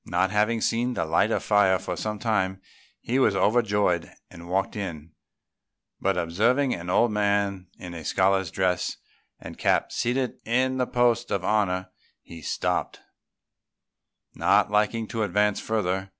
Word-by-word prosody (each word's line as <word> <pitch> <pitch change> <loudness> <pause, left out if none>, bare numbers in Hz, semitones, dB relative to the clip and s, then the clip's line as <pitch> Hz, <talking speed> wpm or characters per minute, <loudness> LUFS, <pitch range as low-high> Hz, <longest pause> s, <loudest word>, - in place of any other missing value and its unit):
Not 95 - +1
having 105 +2 +1
seen 120 +3 0
the - - -1
light 85 +6 +2
of - - -1
fire 100 -3 +4
for 95 - -5
some 105 -1 -3
time, 95 -4 -1 0.4
he 125 +3 0
was 105 -6 +3
overjoyed 105 -5 +1 0.2
and 85 -1 -11
walked 95 +1 -1
in; 85 -6 -6 0.9
but 95 -1 0
observing 115 +11 +1
an 90 0 -6
old 120 +5 +3
man 100 -2 0
in 90 -1 -9
a 80 -2 -7
scholar's 95 0 +1
dress 90 0 -1 0.4
and - - -10
cap - - +1
seated 125 +1 -1
in 130 +3 +1
the 125 -1 0
post 120 -1 +1
of 95 -2 -2
honour, 95 -3 0 0.3
he 85 -1 -11
stopped, - - -2 1.3
not - - +2
liking 105 +2 +1
to 115 - -3
advance 105 -1 +1
further. 95 -3 -2
100 Hz, 150 wpm, -25 LUFS, 95-115 Hz, 1.3 s, fire